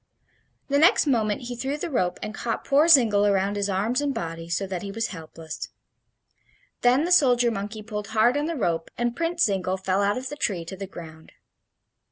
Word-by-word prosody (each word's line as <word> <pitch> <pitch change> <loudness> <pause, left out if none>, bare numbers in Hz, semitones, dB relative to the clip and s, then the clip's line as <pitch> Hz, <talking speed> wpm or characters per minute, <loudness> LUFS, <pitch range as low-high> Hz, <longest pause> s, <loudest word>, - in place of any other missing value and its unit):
The 280 0 +2
next 330 +2 +5
moment 220 -7 +1
he 245 0 -5
threw 270 +4 -3
the 330 +2 -5
rope 180 -9 0
and 215 0 -5
caught 230 +1 -4
poor 290 +3 +4
Zingle 230 -10 +6
around 200 0 +1
his 205 0 -1
arms 210 +8 0
and 285 -1 -1
body, 165 0 -5
so 175 +4 -1
that 185 -2 -5
he 200 - -6
was 225 +3 -2
helpless. 160 -2 -8 1.1
Then 250 +4 +4
the 355 - -2
soldier 245 -8 +4
monkey 210 +1 -5
pulled 210 -1 -5
hard 220 +4 +3
on 290 +1 0
the 335 - -3
rope, 170 - -1
and 240 0 -1
Prince 335 +1 0
Zingle 190 -2 0
fell 190 +1 0
out 205 +2 +1
of 260 +1 -5
the 290 - -6
tree 195 - -2
to 190 - -7
the 195 0 -7
ground. 160 -3 -12
215 Hz, 205 wpm, -25 LUFS, 190-260 Hz, 1.1 s, Zingle